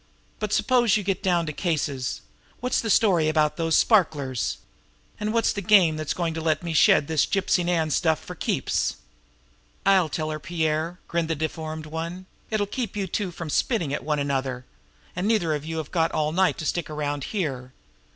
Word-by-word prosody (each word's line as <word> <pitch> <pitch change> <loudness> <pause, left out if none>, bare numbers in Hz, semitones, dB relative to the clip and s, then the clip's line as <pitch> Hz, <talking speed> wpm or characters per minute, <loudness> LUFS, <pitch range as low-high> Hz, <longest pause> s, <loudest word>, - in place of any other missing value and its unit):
But 215 -1 -3
suppose 240 -3 +3
you 210 - -3
get 195 0 -1
down 175 -3 +2
to 155 - -4
cases. 145 -7 -2 0.4
What's 250 +1 0
the 225 - -3
story 180 -7 +4
about 155 -1 +2
those 165 -1 +2
sparklers? 145 - +2 0.6
And 210 0 -1
what's 230 0 +2
the 200 - -3
game 190 -6 +5
that's 155 0 -3
going 170 -2 -1
to 160 - -4
let 155 0 0
me 170 -1 -3
shed 155 - +5
this 160 -2 +2
Gypsy 190 -2 +1
Nan 165 -3 0
stuff 160 +1 +2
for - - -9
keeps?" - - -1 0.9
"I'll 190 -5 +4
tell 155 +2 -2
her, 155 - -4
Pierre," 160 +2 -1
grinned 170 -1 -1
the 165 - +1
deformed 155 0 -4
one. 165 +4 -5 0.2
"It'll 215 -2 0
keep 220 0 -4
you 200 - 0
two 190 +1 -2
from 165 -3 -6
spitting 170 - 0
at - - -3
one 150 -1 0
another; 135 -3 -2 0.5
and 180 +3 -1
neither 200 -8 +2
of 150 0 -3
you 160 0 -4
have 155 -2 -5
got 165 -2 +1
all 155 -1 0
night 185 +3 +2
to 155 - -5
stick 170 +1 -1
around 145 -2 -3
here." 135 - -3
165 Hz, 190 wpm, -25 LUFS, 155-190 Hz, 0.9 s, game